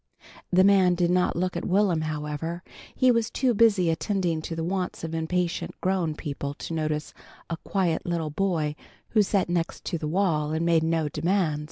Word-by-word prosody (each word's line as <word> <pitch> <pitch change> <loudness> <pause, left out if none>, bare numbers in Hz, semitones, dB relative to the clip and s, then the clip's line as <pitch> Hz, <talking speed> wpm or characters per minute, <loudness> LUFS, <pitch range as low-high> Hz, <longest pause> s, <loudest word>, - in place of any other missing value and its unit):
The 185 +1 +5
man 190 -2 +5
did 175 0 +1
not 180 0 +2
look 180 +1 -1
at 170 - -3
Will'm, 185 -4 +2
however. 155 +3 -4 0.3
He 255 -1 +4
was 230 -1 +1
too 255 -1 +1
busy 200 -6 +4
attending 175 -2 -1
to 165 - -5
the 165 - -3
wants 180 0 -3
of 165 0 -4
impatient 170 +2 -2
grown 180 -4 0
people 140 -2 -5
to 165 - -6
notice 155 -1 -2 0.4
a 165 - -2
quiet 175 -2 -1
little 165 -3 -2
boy 160 -4 0 0.3
who 215 - +4
sat 200 -2 +1
next 170 -1 -2
the 160 -3 -2
wall 155 -3 +1
and 160 +1 0
made 165 -1 +4
no 160 -1 +1
demands. 165 -1 0
170 Hz, 180 wpm, -26 LUFS, 160-190 Hz, 0.4 s, The